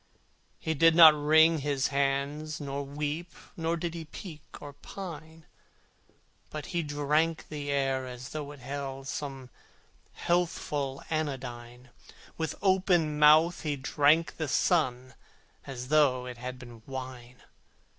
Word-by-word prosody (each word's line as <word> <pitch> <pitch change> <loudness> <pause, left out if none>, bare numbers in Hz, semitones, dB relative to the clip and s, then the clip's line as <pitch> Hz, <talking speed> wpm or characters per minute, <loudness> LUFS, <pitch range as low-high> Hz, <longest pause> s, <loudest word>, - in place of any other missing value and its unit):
He 160 - -2
did 165 +2 +5
not 165 -2 +10
wring 160 +2 +4
his 140 -1 0
hands 140 +2 -1
nor 140 -1 -4
weep, 150 +4 -4 0.2
Nor 165 0 -1
did 170 0 -3
he 165 -1 -6
peek 155 0 -9 0.2
or 145 -1 -9
pine, 160 0 -9 1.0
But 155 -1 -6
he 170 - +1
drank 150 +2 0
the 145 -2 -5
air 135 -2 0
as 125 0 -8
though 150 -2 -5
it 145 -2 -13
held 135 0 -5
Some 135 -4 -6 0.6
healthful 150 -6 -1
anodyne; 125 -5 -4 0.4
With 160 -1 -3
open 180 -6 +2
mouth 155 +3 +6
he 150 -2 -1
drank 145 +4 +2
the 155 - -2
sun 130 -5 +1 0.5
As 125 -2 -6
though 140 -5 +3
it 125 -1 -7
had 125 +1 -6
been 120 -3 -12
wine! 130 -2 -8
145 Hz, 130 wpm, -29 LUFS, 135-160 Hz, 1.0 s, not